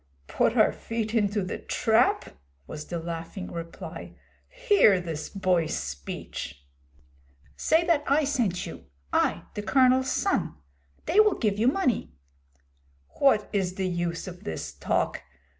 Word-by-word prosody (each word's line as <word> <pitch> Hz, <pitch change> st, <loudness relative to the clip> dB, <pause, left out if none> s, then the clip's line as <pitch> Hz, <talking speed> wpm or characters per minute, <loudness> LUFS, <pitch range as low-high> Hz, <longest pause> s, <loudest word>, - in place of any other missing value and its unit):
'Put -, -, +1 dB
our -, -, +5 dB
feet 225 Hz, -1 st, -4 dB
into 205 Hz, -2 st, +1 dB
the 185 Hz, -, -4 dB
trap?' 240 Hz, -, +1 dB, 0.3 s
was 155 Hz, 0 st, -7 dB
the 175 Hz, -, -3 dB
laughing 165 Hz, +3 st, -6 dB
reply. 170 Hz, 0 st, -8 dB, 0.3 s
'Hear 420 Hz, -, +4 dB
this 160 Hz, -3 st, -5 dB
boy's 180 Hz, -, 0 dB
speech!' 70 Hz, -1 st, -6 dB, 0.9 s
'Say 325 Hz, -, +2 dB
that 335 Hz, -4 st, +2 dB
I 290 Hz, +3 st, +3 dB
sent 240 Hz, -11 st, 0 dB
you -, -, -9 dB, 0.3 s
I, -, -, +2 dB
the 210 Hz, -, -4 dB
Colonel's 260 Hz, +3 st, +3 dB
son. 390 Hz, -, 0 dB, 0.5 s
They 400 Hz, -, +3 dB
will 425 Hz, -2 st, +5 dB
give 210 Hz, -3 st, 0 dB
you 230 Hz, -, +3 dB
money.' 260 Hz, -, 0 dB, 1.0 s
'What 220 Hz, -7 st, +4 dB
is 185 Hz, -3 st, 0 dB
the 190 Hz, -1 st, -1 dB
use 175 Hz, 0 st, -2 dB
of 180 Hz, -1 st, -9 dB
this 80 Hz, -2 st, -5 dB
talk? 70 Hz, -, -1 dB
200 Hz, 135 wpm, -27 LUFS, 170-260 Hz, 1.0 s, our